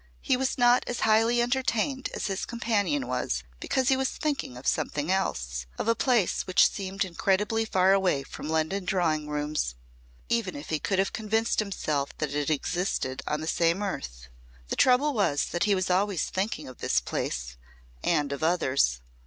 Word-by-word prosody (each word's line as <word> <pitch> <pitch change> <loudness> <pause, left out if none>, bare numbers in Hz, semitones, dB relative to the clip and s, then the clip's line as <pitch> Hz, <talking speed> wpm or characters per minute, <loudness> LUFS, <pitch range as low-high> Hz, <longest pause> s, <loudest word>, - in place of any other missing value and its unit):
He 265 - +3
was 265 +1 -1
not 245 0 +5
as 245 - -3
highly 225 +2 +4
entertained 260 +1 0
as - - -3
his 195 -1 -2
companion 235 +4 0
was - - -1 0.2
because 260 -2 0
he 265 - +5
was 265 0 0
thinking 285 - -3
of 125 - -11
something 150 +4 0
else - - -1
of - - -3
a 230 - +5
place 230 -4 +1
which 185 - +6
seemed 195 0 -3
incredibly 205 +5 0
far 190 -2 +3
away 185 -8 +2
from 150 - -8
London 160 +5 0
drawing 165 -5 0
rooms 150 - -2 0.5
even 235 +4 0
if 290 - -8
he 155 - +1
could 195 - -1
have 195 +1 +1
convinced 220 +1 0
himself 155 -9 -2
that 150 -2 -2
it 145 0 -1
existed 155 -3 -1
on 150 +1 -1
the 160 - -5
same 170 +4 +1
earth. 60 - -5 0.4
The - - -1
trouble 265 +4 +4
was 200 - +1
that 175 +3 +1
he 205 -1 +3
was 185 -1 -1
always 190 -2 +1
thinking 190 -4 -2
of 130 - -11
this 60 - +2
place - - -4 0.5
and 145 -1 +1
of 140 - -6
others. 140 - +2
190 Hz, 180 wpm, -27 LUFS, 150-225 Hz, 0.5 s, which